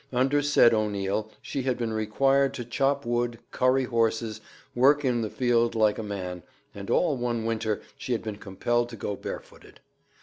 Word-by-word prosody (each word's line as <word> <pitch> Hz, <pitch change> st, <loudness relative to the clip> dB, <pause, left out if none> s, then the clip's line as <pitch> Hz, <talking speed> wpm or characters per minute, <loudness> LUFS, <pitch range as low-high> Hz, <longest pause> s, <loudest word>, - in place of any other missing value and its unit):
Under 135 Hz, +3 st, +2 dB
said 145 Hz, -5 st, +5 dB
O'Neil 105 Hz, -1 st, -1 dB
she 140 Hz, -, -3 dB
had 130 Hz, -1 st, -1 dB
been 115 Hz, -2 st, -2 dB
required 135 Hz, +6 st, +2 dB
to 120 Hz, -, -5 dB
chop 140 Hz, +4 st, 0 dB
wood, 120 Hz, 0 st, -1 dB
curry 130 Hz, +1 st, +2 dB
horses, 115 Hz, -2 st, 0 dB, 0.3 s
work 140 Hz, +4 st, +4 dB
in 120 Hz, -2 st, +1 dB
the 110 Hz, -, -2 dB
field 120 Hz, -1 st, +1 dB
like 110 Hz, -1 st, +2 dB
a -, -, -1 dB
man, 95 Hz, -4 st, -5 dB, 0.3 s
and 100 Hz, -1 st, -8 dB
all 165 Hz, -5 st, +2 dB
one 120 Hz, -2 st, -2 dB
winter 110 Hz, -2 st, -1 dB, 0.2 s
she 125 Hz, -, -2 dB
had 115 Hz, -, -2 dB
been 110 Hz, -2 st, -5 dB
compelled 120 Hz, +4 st, -1 dB
to 115 Hz, -, -8 dB
go 100 Hz, -1 st, -4 dB
barefooted. -, -, -9 dB
115 Hz, 175 wpm, -27 LUFS, 110-130 Hz, 0.3 s, said